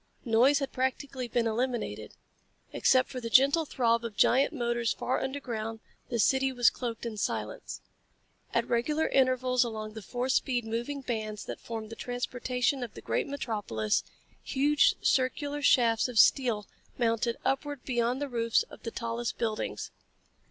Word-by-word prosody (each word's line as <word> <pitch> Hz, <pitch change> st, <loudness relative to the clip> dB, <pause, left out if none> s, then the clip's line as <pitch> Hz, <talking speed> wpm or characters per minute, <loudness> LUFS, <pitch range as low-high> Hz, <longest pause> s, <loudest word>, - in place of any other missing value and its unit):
Noise 245 Hz, +5 st, +4 dB
had 275 Hz, -1 st, -2 dB
practically 260 Hz, 0 st, -2 dB
been 235 Hz, 0 st, 0 dB
eliminated. 240 Hz, +2 st, -2 dB, 0.6 s
Except 255 Hz, -1 st, +3 dB
for 255 Hz, -, -6 dB
the 230 Hz, -, -4 dB
gentle 280 Hz, +7 st, +5 dB
throb 235 Hz, -4 st, +1 dB
of 220 Hz, -3 st, -6 dB
giant 270 Hz, +3 st, +4 dB
motors 240 Hz, -5 st, 0 dB
far 255 Hz, -, -1 dB
underground, 235 Hz, -5 st, -4 dB, 0.3 s
the 240 Hz, -, -1 dB
city 265 Hz, +4 st, +3 dB
was 245 Hz, -2 st, +4 dB
cloaked 235 Hz, -2 st, -5 dB
in 225 Hz, -2 st, -4 dB
silence. 110 Hz, -, -3 dB, 0.7 s
At 235 Hz, 0 st, 0 dB
regular 295 Hz, +7 st, +1 dB
intervals 255 Hz, -1 st, +3 dB
along 215 Hz, -2 st, -5 dB
the 220 Hz, -, -7 dB
four 245 Hz, +5 st, -3 dB
speed 250 Hz, -2 st, +1 dB
moving 240 Hz, +6 st, -3 dB
bands 220 Hz, -4 st, -4 dB
that -, -, -6 dB
formed 225 Hz, -1 st, -6 dB
the -, -, -6 dB
transportation 250 Hz, +2 st, -1 dB
of 240 Hz, -3 st, -6 dB
the -, -, -9 dB
great -, -, -1 dB
metropolis, 205 Hz, -, -1 dB, 0.4 s
huge 290 Hz, +2 st, +3 dB
circular 285 Hz, +3 st, +1 dB
shafts 235 Hz, -5 st, +4 dB
of 245 Hz, -2 st, -6 dB
steel 230 Hz, -3 st, +4 dB, 0.3 s
mounted 230 Hz, 0 st, +1 dB
upward 285 Hz, 0 st, -1 dB
beyond 245 Hz, 0 st, 0 dB
the 290 Hz, -, -2 dB
roofs 230 Hz, -3 st, +1 dB
of -, -, -12 dB
the 230 Hz, -, -4 dB
tallest 230 Hz, 0 st, -3 dB
buildings. 220 Hz, -2 st, -3 dB
245 Hz, 150 wpm, -29 LUFS, 230-265 Hz, 0.7 s, gentle